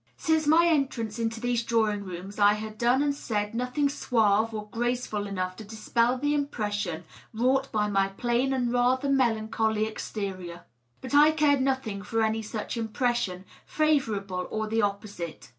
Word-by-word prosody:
Since 320 -2 +1
my 325 +3 +6
entrance 265 -9 0
into 225 0 -2
these 245 0 0
drawing 220 -3 0
rooms 190 +2 -8
I 205 0 +6
had 215 0 -7
done 245 +4 +3
and 290 -1 +1
said 210 -6 -3
nothing 250 +5 0
suave 225 -6 +2
or 210 -1 -6
graceful 240 -3 -2
enough 185 -2 -3
to 220 - -8
dispel 230 +3 0
the 290 +3 0
impression 210 - -2 0.3
wrought 265 +4 +1
by 210 -1 +1
my 195 -1 +2
plain 240 +6 0
and 245 -2 0
rather 255 +3 +2
melancholy 220 -4 +1
exterior. 190 -5 -5 0.4
But 260 - -7
I 295 +1 +7
cared 300 -3 +3
nothing 260 -7 -1
for 225 +3 -1
any 220 0 0
such 215 +2 -5
impression, 225 -4 -1 0.2
favorable 215 -12 0
or 220 0 -2
the 225 +1 0
opposite. 200 -5 -4
225 Hz, 160 wpm, -27 LUFS, 205-260 Hz, 0.4 s, I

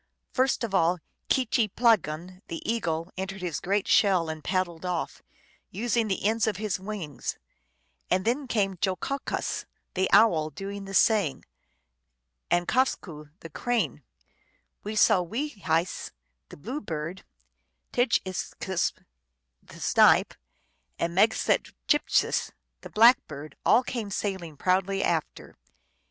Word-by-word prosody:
First 260 -1 +1
of 225 -4 -3
all 180 -1 +3 0.3
Kicheeplagon, 210 - +1
the 165 - -5
Eagle, 170 -7 -1
entered 190 0 -5
his 170 -4 -2
great 200 +2 0
shell 185 -5 +4
and 155 -1 -6
paddled 185 -3 -1
off, 180 -2 -3 0.5
using 230 +2 0
the 195 -1 -2
ends 220 0 +2
of 210 -4 0
his 210 -3 -2
wings; 190 -8 -5 0.7
and 185 - +1
then 260 +4 0
came 195 -6 0
Jo 190 -2 +1
ko 275 +8 -3
kas, - - -3 0.3
the 190 0 +1
Owl, 180 -7 +5
doing 195 +5 -7
the 195 0 -6
same; 205 -11 +3 1.1
and 175 0 +2
JfosqiC, 175 - -1
the 165 - -10
Crane, 245 +8 -1 0.8
Wee 210 +1 -4
sow 195 -3 +5
wee 235 - -3
Jiessis, 170 - -1 0.4
the - - -11
Bluebird, 180 - -5 0.7
Tjidge 245 -1 +3
is 185 -1 -4 0.2
skwess, 190 -2 0 0.7
the - - -14
Snipe, - - +4 0.6
and 170 0 -1
Meg 210 +5 +4
sweit - - 0
tcMp 295 - +2
siS) - - +2 0.3
the - - -9
Blackbird, 210 - +3
all 250 - +5
came 235 -5 -4
sailing 190 -6 -4
proudly 190 +3 +1
after. 160 -2 -2
195 Hz, 130 wpm, -27 LUFS, 170-220 Hz, 1.1 s, Owl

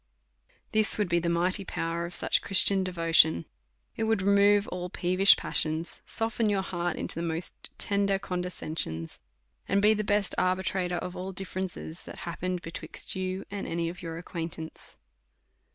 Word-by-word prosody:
This 215 0 +5
Avould 205 -4 0
be 170 0 +3
the 170 0 -1
mighty 180 +4 +1
power 170 -1 -3
of 175 - -8
such - - +2
Christian 195 0 +4
devotion; 165 - +3 0.5
it 225 - -1
would 220 -3 +1
remove 200 +1 +4
all 180 0 -4
peevish 185 +3 +5
passions, 160 +2 -1
soften 225 -1 0
your 195 -2 +1
heart 175 -2 -2
into - - -3
the 165 - -4
most 165 0 -4
tender 200 -1 +2
condescensions, 175 - -4 0.5
and 200 - +2
be 210 +2 +5
the 215 0 -1
best 205 -1 +2
arbitrator 185 -1 0
of 180 +1 -5
all 185 +1 -5
differences 185 -3 -4
that - - -9
happened 180 +1 -3
between 165 - -7 0.2
you 185 0 -3
and 200 -1 -4
any 165 0 -1
of 175 +2 -9
your 165 -2 -5
acquaintance. 165 -2 -7
180 Hz, 155 wpm, -28 LUFS, 170-200 Hz, 0.5 s, This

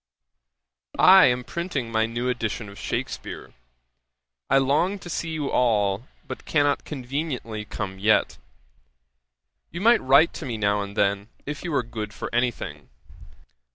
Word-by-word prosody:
'I 190 +1 +8
am 125 0 +1
printing 145 -7 -4
my 110 0 +2
new 120 +2 -3
edition 115 -3 -2
of 100 +1 -12
Shakspeare. 120 +3 -5 1.0
'I 135 - +5
long 150 +9 +2
to 175 -2 -9
see 165 - -3
you 155 -3 -3
all, 105 -1 +1 0.2
but - - -7
cannot 145 -2 +1
conveniently 130 -5 -4
come 95 -2 -5
yet. 110 +2 +2 1.3
You 170 - -6
might 235 +3 +5
write 140 +5 +5
to 160 - -7
me 115 -3 -3
now 100 -1 +1
and 100 +1 -7
then, 100 +2 +1 0.2
if 145 +1 -5
you 175 - -3
were 140 - +1
good 110 -2 -6
for - - -6
any 120 +1 +3
thing. 75 - -9
125 Hz, 150 wpm, -25 LUFS, 110-145 Hz, 1.3 s, I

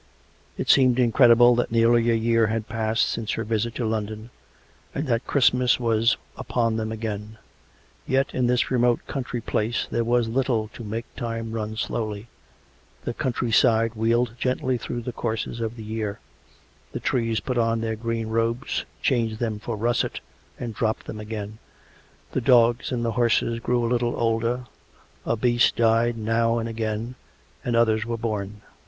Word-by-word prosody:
It - - -3
seemed 130 -2 +5
incredible 120 0 +6
that 120 -1 0
nearly 115 0 +4
a 115 - +4
year 115 0 +2
had 110 0 -2
passed 110 0 0
since 110 -2 -2
her 115 - -2
visit 115 +1 -1
to 120 - -2
London, 110 +1 -3 0.6
and 145 - -1
that 120 -2 -1
Christmas 125 -2 +3
was 115 -1 +2 0.2
upon 115 -2 -1
them 110 0 -2
again. 110 -1 -5 0.7
Yet 135 +1 +1
in 125 -1 +1
this 125 +1 +1
remote 120 -1 +2
country 125 -3 -4
place 110 +2 -1
there 115 - +1
was 120 0 +2
little 115 -3 0
to 120 - -10
make 115 +2 -4
time 115 -2 -4
run 110 -1 -3
slowly: 110 0 -3 0.7
the 120 - -3
country 120 -2 -2
side 115 +1 +4
wheeled 115 +1 +1
gently 130 0 0
through 120 0 -4
the 125 - -4
courses 115 0 -3
of 115 0 -3
the 115 - -8
year; 105 -1 -3 0.8
the - - -3
trees 115 -3 0
put 125 -4 -2
on 115 0 +1
their 110 -1 -2
green 115 0 -3
robes, 115 +4 -1 0.2
changed 115 -4 +1
them 110 -2 -2
for 115 +1 -4
russet 120 +3 0 0.4
and 120 -2 -4
dropped 110 +1 -1
them 110 - -7
again; 105 0 -6 0.7
the 130 - -1
dogs 120 0 +4
and 120 -2 -1
the 115 - 0
horses 115 -1 +1
grew 120 0 0
a 115 - -1
little 120 -1 +1
older, 115 +2 0 0.6
a 115 - +1
beast 120 +1 +3
died 115 +1 +2
now 115 +1 +1
and 115 0 -2
again, 110 +1 -3 0.5
and 120 - -1
others 110 -2 +3
were 115 0 -3
born. 105 -2 -4
115 Hz, 165 wpm, -24 LUFS, 110-120 Hz, 0.8 s, incredible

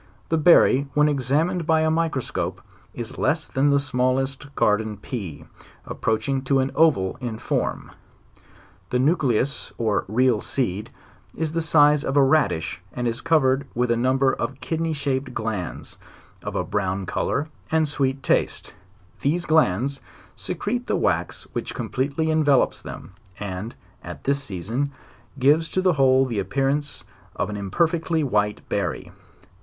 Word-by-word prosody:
The 165 - +2
berry 145 -4 +5
when 150 0 +5
examined 150 +5 0
by 160 -1 +4
a 160 0 +2
microscope, 160 -5 -2 0.3
is 120 +1 -7
less 160 +1 +1
than 140 +2 +1
the 140 - +4
smallest 135 +1 -1
garden 105 0 +1
pea, 95 - -6 0.4
approaching 130 +5 -1
to 135 0 +3
an 135 0 +1
oval 145 -13 +3
in 120 -3 -4
form. - - -2 1.0
The 125 - +1
nucleus, 135 -2 +1
or 110 -4 0
real 120 +1 +2
seed, 105 -6 -2 0.5
is 160 -1 -2
the 165 - 0
size 150 -2 +4
of 135 - -1
a 140 - +7
radish 135 - +1
and 125 -1 -2
is 115 0 -2
covered 140 -4 +2
with 125 0 +1
a - - +3
number 130 +2 +2
of 135 -1 -4
kidney 165 0 -2
shaped 140 -2 -2
glands, 110 -5 -4 0.4
of - - -6
a - - 0
brown 95 -1 -2
color 145 - -1 0.2
and 160 -1 +2
sweet 135 -2 -1
taste; - - 0 0.5
these 170 +5 0
glands 140 - +2 0.3
secrete - - -3
the - - +1
wax - - 0
which - - -4
completely 140 +4 -1
envel 150 -4 +4
ops - - -4
them, 95 - -9 0.3
and, 100 +3 -5 0.3
at - - -8
this 140 +1 0
season, 110 +8 -3 0.5
gives 150 +5 +3
to - - -1
the 185 -1 +3
whole 135 -2 +4
the 115 -5 -2
appear 135 +8 0
ance 145 +1 -2 0.3
of 100 +1 -2
an - - -4
imperfectly 160 - 0
white 105 -5 0
berry. - - -2
135 Hz, 150 wpm, -23 LUFS, 115-150 Hz, 1.0 s, a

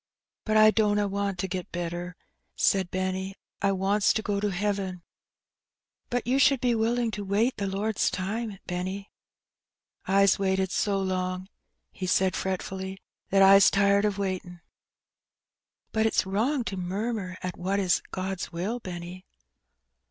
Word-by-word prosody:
But 215 -1 +2
I 215 0 +8
dunna 210 -2 +2
want 200 -1 -2
to 190 - -2
get 185 -1 -5
better," 175 +1 -4 0.4
said 190 -2 +2
Benny; 185 +1 -2 0.3
"I 200 0 +3
wants 195 +2 +2
to 220 - -1
go 205 -1 -1
to 205 0 0
heaven/' 195 -2 -2 1.1
"But 245 -1 -1
you 255 +3 +2
should 275 -1 +5
be 245 0 +2
willing 230 +1 +1
to 205 0 -4
wait 210 +6 +1
the 200 - -2
Lord's 200 +2 0
time, 205 +3 -3
Benny." 185 +2 -4 1.0
'^Fs 195 0 +4
waited 190 -1 +1
so 200 -2 +1
long/' 185 0 -2 0.4
he 185 - -5
said 185 0 +2
fretfully, 190 0 -3 0.3
'^that 195 0 +4
Fs 195 0 +8
tired 200 0 +3
of 205 -2 0
waitin'." 185 -3 -4 1.3
'^But 220 0 +3
it's 220 - +1
wrong 235 +8 0
to 195 -4 -4
murmur 190 +1 -3
at 180 -1 -3
what 190 +3 -1
is 185 -2 +2
God's 185 -1 -4
will, 190 +8 -3
Benny." 180 -2 -8
195 Hz, 145 wpm, -27 LUFS, 185-210 Hz, 1.3 s, I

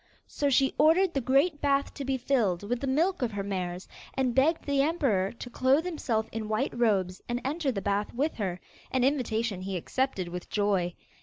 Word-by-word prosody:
So 285 - -1
she 270 0 +3
ordered 335 +5 +5
the 275 - 0
great 280 +5 +2
bath 280 -1 +1
to 280 - -6
be 270 0 0
filled 235 -9 +1
with 235 +4 -2
the 275 - -3
milk 330 +7 +1
of 235 -4 -1
her 200 -1 -2
mares, 185 -2 -4 0.3
and 260 -2 +1
begged 305 +6 +2
the 280 -1 +2
emperor 270 - +1
to 245 +1 -8
clothe 265 +7 +2
himself 240 -11 -1
in 220 -1 -4
white 215 +2 -1
robes, 195 -6 +1
and 240 0 -1
enter 290 0 0
the 200 -5 -4
bath 205 +1 0
with 290 +6 -1
her, 185 -5 -2 0.3
an 260 -1 +1
invitation 230 -7 0
he 190 0 -3
accepted 195 -1 -2
with 180 0 -7
joy. 195 -4 0
245 Hz, 200 wpm, -28 LUFS, 200-280 Hz, 0.3 s, ordered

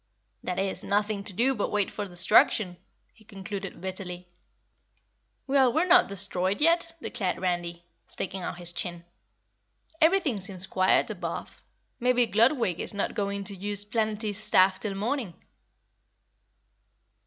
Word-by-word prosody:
"That 180 - -4
is, 195 0 -2
nothing 205 0 0
to - - -1
do 245 +8 +2
but 210 - -2
wait 205 -2 0
for 205 -1 -5
destruction," 180 +1 +3 0.4
he 220 - -22
concluded 195 -1 -7
bitterly. 180 -1 -6 1.2
"Well, 270 -2 +4
we're 320 +8 +2
not 360 0 +6
destroyed 195 0 +1
yet!" 335 +1 +3
declared 195 -7 -2
Randy, 175 -2 -2 0.2
sticking 190 0 -4
out 175 - -5
his 175 -1 -6
chin. 175 -1 -4 1.0
"Everything 320 - +3
seems 190 -1 -2
quiet 185 0 +2
above. - - -6 0.4
Maybe 245 0 +3
Gludwig 230 - +2
is - - -5
not 200 - -1
going 200 -1 -2
to 200 0 -3
use 205 +1 -2
Planetty's 215 -1 -1
staff 190 -3 +4
till 205 -3 -3
morning." 220 - -2
200 Hz, 130 wpm, -27 LUFS, 185-230 Hz, 1.2 s, not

